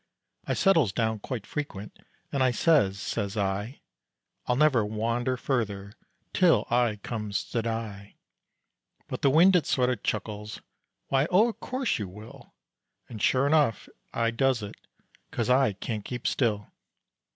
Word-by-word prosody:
I -, -, 0 dB
settles 165 Hz, -, +3 dB
down 110 Hz, 0 st, -1 dB
quite 115 Hz, 0 st, -5 dB
frequent 105 Hz, -9 st, -6 dB, 0.3 s
and 140 Hz, -, -1 dB
I 130 Hz, -, +4 dB
says, 120 Hz, -, +3 dB
says 100 Hz, +2 st, -3 dB
I, 100 Hz, +5 st, -2 dB, 0.7 s
"I'll 125 Hz, -, +2 dB
never 140 Hz, -5 st, +4 dB
wander 115 Hz, +4 st, -1 dB
further 100 Hz, -7 st, -2 dB, 0.4 s
till 180 Hz, -3 st, +4 dB
I 120 Hz, -2 st, +2 dB
comes 105 Hz, -3 st, -3 dB
to 115 Hz, -, 0 dB
die." 110 Hz, -3 st, -5 dB, 0.9 s
But -, -, -5 dB
the 140 Hz, -, +4 dB
wind 175 Hz, +7 st, +6 dB
it 175 Hz, -, +2 dB
sorta 125 Hz, -1 st, +2 dB
chuckles, 105 Hz, 0 st, -4 dB, 0.5 s
"Why, 135 Hz, +2 st, +2 dB
o' 215 Hz, +6 st, +4 dB
course 255 Hz, -, -2 dB
you 105 Hz, -, -3 dB
will," 105 Hz, +5 st, -13 dB, 0.5 s
And 110 Hz, -3 st, -8 dB
shure 130 Hz, +1 st, +3 dB
enough 145 Hz, -7 st, +2 dB, 0.2 s
I 115 Hz, 0 st, 0 dB
does 125 Hz, -1 st, +1 dB
it, 100 Hz, -, -6 dB, 0.6 s
cause 120 Hz, +1 st, -1 dB
I 130 Hz, -4 st, +4 dB
can't 105 Hz, +2 st, -5 dB
keep 125 Hz, +1 st, -6 dB
still. 105 Hz, -5 st, 0 dB
115 Hz, 140 wpm, -27 LUFS, 105-135 Hz, 0.9 s, wind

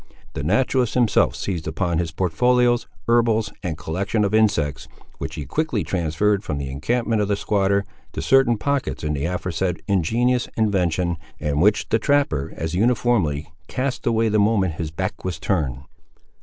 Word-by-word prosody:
The -, -, -4 dB
naturalist 125 Hz, -, +1 dB
himself 120 Hz, -4 st, +3 dB
seized 85 Hz, -6 st, -4 dB
upon 85 Hz, +1 st, -1 dB
his 85 Hz, -2 st, -1 dB
portfolios, 120 Hz, +9 st, +2 dB, 0.2 s
herbals, 115 Hz, -2 st, +2 dB
and 85 Hz, -6 st, -3 dB
collection 100 Hz, +7 st, -1 dB
of 100 Hz, -, -2 dB
insects, 100 Hz, -10 st, +1 dB, 0.3 s
which -, -, -5 dB
he 75 Hz, -, -5 dB
quickly 125 Hz, -, -1 dB
transferred 90 Hz, +5 st, 0 dB
from 75 Hz, -7 st, -3 dB
the 70 Hz, -1 st, -4 dB
encampment 115 Hz, -, 0 dB
of 105 Hz, -, 0 dB
the 100 Hz, -, +1 dB
squatter, 100 Hz, 0 st, +1 dB, 0.3 s
to -, -, -5 dB
certain 135 Hz, -3 st, +4 dB
pockets 140 Hz, -2 st, -2 dB
in 75 Hz, 0 st, -1 dB
the 70 Hz, 0 st, -2 dB
aforesaid 90 Hz, 0 st, -2 dB
ingenious 115 Hz, +7 st, +1 dB
invention, 90 Hz, -5 st, +1 dB, 0.2 s
and 75 Hz, 0 st, 0 dB
which 105 Hz, +3 st, +3 dB
the 115 Hz, -, +2 dB
trapper 140 Hz, -, +1 dB
as 80 Hz, +1 st, -3 dB
uniformly 95 Hz, -9 st, +1 dB
cast 130 Hz, -1 st, -3 dB
away 115 Hz, -1 st, +2 dB
the 110 Hz, 0 st, +2 dB
moment 100 Hz, -4 st, +2 dB
his 80 Hz, -, -3 dB
back 95 Hz, +5 st, -4 dB
was 90 Hz, -4 st, -3 dB
turned. 75 Hz, -8 st, -1 dB
100 Hz, 160 wpm, -22 LUFS, 80-115 Hz, 0.3 s, certain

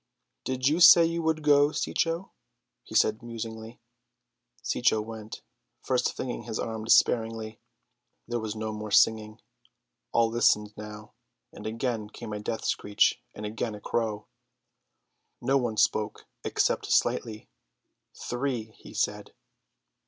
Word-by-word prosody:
"Did 130 Hz, 0 st, 0 dB
you 155 Hz, +4 st, +2 dB
say 170 Hz, -1 st, +9 dB
you 170 Hz, +1 st, -1 dB
would 160 Hz, -1 st, 0 dB
go, 145 Hz, 0 st, +5 dB
Cecco?" 165 Hz, +3 st, -1 dB, 0.5 s
he -, -, -11 dB
said 110 Hz, +1 st, +3 dB
musingly. 115 Hz, 0 st, -7 dB, 0.8 s
Cecco 115 Hz, -3 st, +2 dB
went, 110 Hz, 0 st, -8 dB, 0.4 s
first 125 Hz, -1 st, 0 dB
flinging 125 Hz, -1 st, -4 dB
his 110 Hz, -, -4 dB
arms 110 Hz, 0 st, -4 dB
despairingly. 110 Hz, -1 st, +2 dB, 0.7 s
There 120 Hz, 0 st, -2 dB
was 110 Hz, -1 st, -4 dB
no 110 Hz, 0 st, -3 dB
more 105 Hz, 0 st, -6 dB
singing, 110 Hz, +1 st, +3 dB, 0.7 s
all 115 Hz, -1 st, +2 dB
listened 105 Hz, -3 st, +2 dB
now; 105 Hz, 0 st, -10 dB, 0.4 s
and -, -, -8 dB
again 115 Hz, -1 st, -3 dB
came 110 Hz, 0 st, -8 dB
a 105 Hz, -, -4 dB
death 110 Hz, +2 st, -4 dB
screech 105 Hz, 0 st, +1 dB
and 105 Hz, -, -6 dB
again 110 Hz, +1 st, -3 dB
a -, -, -9 dB
crow. 110 Hz, -1 st, -2 dB, 1.1 s
No 135 Hz, -, +1 dB
one 120 Hz, -4 st, -2 dB
spoke 105 Hz, 0 st, +1 dB, 0.2 s
except -, -, 0 dB
Slightly. 110 Hz, -1 st, 0 dB, 0.7 s
"Three," 120 Hz, -3 st, -3 dB
he -, -, -13 dB
said. -, -, -2 dB
110 Hz, 130 wpm, -28 LUFS, 110-125 Hz, 1.1 s, say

